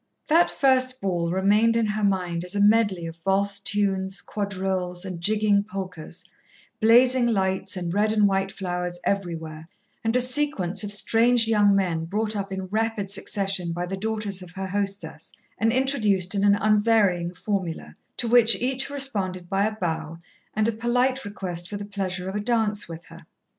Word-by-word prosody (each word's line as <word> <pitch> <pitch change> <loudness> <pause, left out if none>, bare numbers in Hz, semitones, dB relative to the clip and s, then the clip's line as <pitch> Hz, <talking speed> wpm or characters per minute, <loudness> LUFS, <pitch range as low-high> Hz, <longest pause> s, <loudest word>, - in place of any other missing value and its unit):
That 335 +3 +4
first 255 -1 +1
ball 175 -4 -1
remained 205 +5 +3
in 230 -1 +2
her 210 0 -2
mind 180 -4 0
as 180 +2 -7
a - - 0
medley 205 -4 +3
of 165 0 -7
valse 195 +3 0
tunes, 195 -1 -1
quadrilles 190 -3 -3
and 180 -3 -6
jigging 210 +1 +2
polkas, 185 -6 -7 0.6
blazing 245 +2 +5
lights 190 -4 -1
and 175 -2 -3
red 210 +2 +2
and 210 -2 +3
white 195 0 0
flowers 180 -2 -4
everywhere, 165 -5 -3 0.3
and 225 +1 0
a - - +4
sequence 250 - +1
of 205 - -4
strange 225 +3 +3
young 205 -3 +4
men 170 -4 0
brought 210 +4 -1
up 195 -1 -4
in 190 0 -4
rapid 215 0 -2
succession 195 -3 0
by 175 +1 -3
the 190 +2 -4
daughters 210 -1 -3
of 180 - -10
her 190 0 -5
hostess 200 0 -4 0.3
and 225 +1 +2
introduced 215 -8 +1
in 200 -1 0
an 200 0 +5
unvarying 205 -4 +2
formula, 185 -2 -4 0.2
to 240 - -1
which 235 -1 +6
each 260 +2 -1
responded 200 -11 0
by 195 +3 +1
a 215 - -4
bow 165 -4 -3 0.4
and 215 0 +2
a - - +2
polite 245 +4 0
request 180 -4 -6
for 205 - -4
the 205 - -6
pleasure 190 -3 -4
of 190 - -4
a - - 0
dance 215 -2 0
with 165 0 -9
her. - - -15
200 Hz, 175 wpm, -24 LUFS, 185-220 Hz, 0.6 s, which